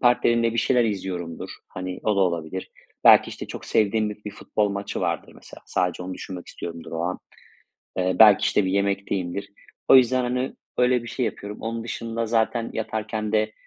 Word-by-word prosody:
partnerimle 120 -2 +3
bir 115 - -3
şeyler 125 -1 +3
izliyorumdur. 90 -5 -4 0.2
Hani 90 0 -6
o 105 -2 +1
da - - +3
olabilir. 85 0 -1 0.3
Belki, - - +8
işte, - - -7
çok - - -8
sevdiğim 110 0 +2
bir 105 0 -10
bir 105 - -4
futbol 105 +1 -1
maçı 100 0 -4
vardır - - -2
mesela. - - -14
Sadece 90 -1 -1
onu 95 +1 -5
düşünmek 90 -2 -8
istiyorumdur 85 -1 -8
o 80 - -2
an. 90 +1 -2 0.8
Eee, 95 0 +1
belki, 105 -3 +8
işte, 105 - +2
bir 95 - 0
yemekteyimdir. 100 -1 -1 0.4
O 135 - +9
yüzden, 130 0 +5
hani, 125 +1 -1 0.2
öyle 125 -1 +3
bir 120 - -8
şey 125 0 -1
yapıyorum. 105 +1 -6
Onun 115 0 -4
dışında 115 0 -3
zaten 115 +1 0
yatarken 110 -1 -3
de, 110 0 +2
105 Hz, 180 wpm, -24 LUFS, 95-115 Hz, 0.8 s, O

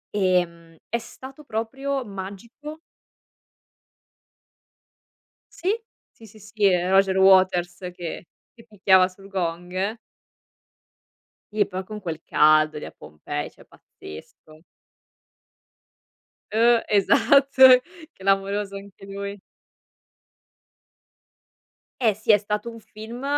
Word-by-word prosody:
Ehm, 170 -4 -1
è 235 - -1
stato 265 +5 -12
proprio 270 +3 -4
magico. 210 +11 -9 2.8
Sì, 375 - -1 0.4
sì, 225 - -18
sì, 215 +1 -17
sì, 210 +1 -7
e 180 -2 +3
Roger 190 0 +3
Waters 185 -2 +4 0.2
che 175 0 -7 0.3
che 230 -1 -18
picchiava 190 -3 +3
sul 195 +1 -16
gong. 185 +3 -3 1.6
Sì, 205 -2 +2
poi 190 -1 -5
con 210 +1 -9
quel 160 -3 -5
caldo 155 0 +3
lì - - -8
a - - -9
Pompei, 75 0 -7
cioè - - -19
pazzesco. 155 - -15 1.9
Uh! 230 +2 +4
Esatto. 260 +5 +5 0.4
Clamoroso 195 +1 -1
anche 195 0 -12
lui. 200 +1 -7 2.6
Eh 220 -3 +3
sì! 215 +1 +1
È 205 - +6
stato 210 +3 -4
un 230 0 -11
film 220 +4 -10
200 Hz, 100 wpm, -23 LUFS, 185-225 Hz, 2.8 s, È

